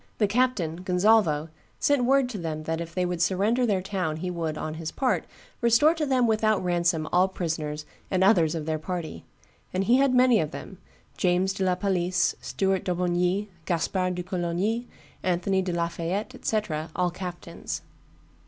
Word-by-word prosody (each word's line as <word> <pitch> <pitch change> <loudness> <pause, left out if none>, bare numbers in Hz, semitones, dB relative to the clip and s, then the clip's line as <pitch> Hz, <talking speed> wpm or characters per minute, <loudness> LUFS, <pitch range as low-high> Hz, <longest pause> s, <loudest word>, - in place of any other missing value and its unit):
The 215 - +3
captain, 205 -7 +1
Gonzalvo, 180 -4 +2 0.3
sent 285 -4 +2
word 270 0 +4
to 215 -5 -5
them 155 -2 -4
that 160 +1 -2
if 165 0 -7
they 180 -1 +1
would 175 -1 -2
surrender 210 +8 +2
their 195 -4 +1
town 185 -6 -2
he 180 +2 -3
would, 165 -3 -3
on 155 - -4
his 160 -1 -4
part, 260 -2 0 0.4
restore 235 +7 +5
to 315 -3 -2
them 255 -2 +3
without 215 -2 +2
ransom 170 -3 +1
all 180 +2 +5
prisoners 155 -5 -3 0.2
and 190 -1 +2
others 175 -6 +4
of 155 -2 -3
their 155 0 -1
party; 160 - -5 0.5
and 185 +1 0
he 235 +5 +4
had 270 -1 +3
many 250 -3 +5
of 155 - -1
them, 190 +3 -9 0.4
James 185 +1 +2
de 195 - -2
la 185 -1 +2
Palisse, 180 -2 +1
Stuart 190 -1 0
d'Aubigny, 180 +2 0 0.2
Gaspard 180 +1 0
de 180 - -3
Coligny, 185 +7 -1 0.3
Anthony 185 +1 +1
de 185 -1 -2
la 170 0 0
Fayette, 185 +9 -3
&c., 220 - +2 0.4
all 180 -1 +1
captains. 175 -1 -6
180 Hz, 170 wpm, -26 LUFS, 170-210 Hz, 0.5 s, restore